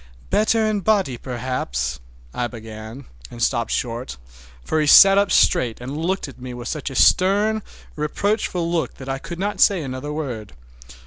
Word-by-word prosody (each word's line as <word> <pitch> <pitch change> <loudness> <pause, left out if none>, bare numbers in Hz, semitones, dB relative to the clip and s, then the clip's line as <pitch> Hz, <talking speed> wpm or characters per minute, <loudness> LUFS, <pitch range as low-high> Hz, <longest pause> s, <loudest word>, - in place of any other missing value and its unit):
"Better 220 +1 +2
in 215 -1 0
body 195 - +1
perhaps"—I 65 - -4
began, 110 +2 -10 0.2
and 120 - -11
stopped 120 -1 0
short, 120 - -3 0.5
for 155 - 0
he 150 - 0
sat 195 +6 +8
up 200 0 +1
straight 125 - +3
and 130 +4 -6
looked 175 +4 -2
at 135 -2 -13
me 125 -1 -7
with 120 0 -6
such 150 -2 -4
a 135 - -9
stern, 205 +8 +3 0.3
reproachful 180 +3 -1
look 170 -1 -2
that 130 - -11
I 135 0 -2
could 170 +4 -8
not 200 +3 -2
say 190 -5 +4
another 130 +2 -5
word. 125 - -5
140 Hz, 165 wpm, -21 LUFS, 120-190 Hz, 0.5 s, sat